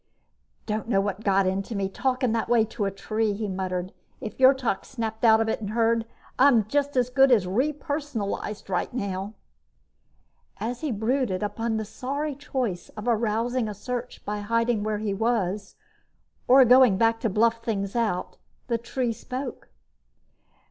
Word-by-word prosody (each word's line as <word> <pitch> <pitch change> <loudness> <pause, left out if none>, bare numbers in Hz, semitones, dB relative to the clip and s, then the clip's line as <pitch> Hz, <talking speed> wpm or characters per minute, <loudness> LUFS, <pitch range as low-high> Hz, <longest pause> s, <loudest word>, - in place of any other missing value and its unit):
"Don't 215 +1 -3
know 195 - +3
what 200 +1 -2
got 195 -1 +3
into 195 +4 -2
me, 195 -1 0
talking 255 +4 0
that 225 0 -1
way 235 -2 +4
to 220 -1 -3
a - - +1
tree," 215 +2 -1
he 210 +1 -3
muttered. 185 -1 -3 0.3
"If 215 - -6
Yrtok 260 -5 +4
snapped 225 -3 -5
out 220 -1 +6
of 225 - +1
it 220 - -1
and 205 - -4
heard, 230 +1 +1 0.3
I'm 255 -6 +5
as 275 -4 +1
good 270 +1 +5
as 215 -7 +4
re 245 +12 +1
personalized 280 -8 -4
right 185 -2 -1
now." 200 -3 -4 1.2
As 235 +2 -4
he 305 -4 -1
brooded 220 -2 0
upon 225 +2 -2
the 220 - -3
sorry 280 +7 -3
choice 255 -10 -3
of 210 +3 -6
arousing 230 +1 +1
a 210 - -6
search 245 +4 -6
by 210 0 -3
hiding 230 +1 +1
where 215 0 -1
he 205 -1 -2
was 205 -2 -1 0.7
or 260 +1 +8
going 250 -4 +6
back 225 +1 +3
to 225 - 0
bluff 230 +3 +2
things 200 -3 -2
out, 220 -6 -1 0.3
the 235 -2 -1
tree 240 0 -2
spoke. 255 +4 -6
225 Hz, 160 wpm, -26 LUFS, 205-250 Hz, 1.2 s, or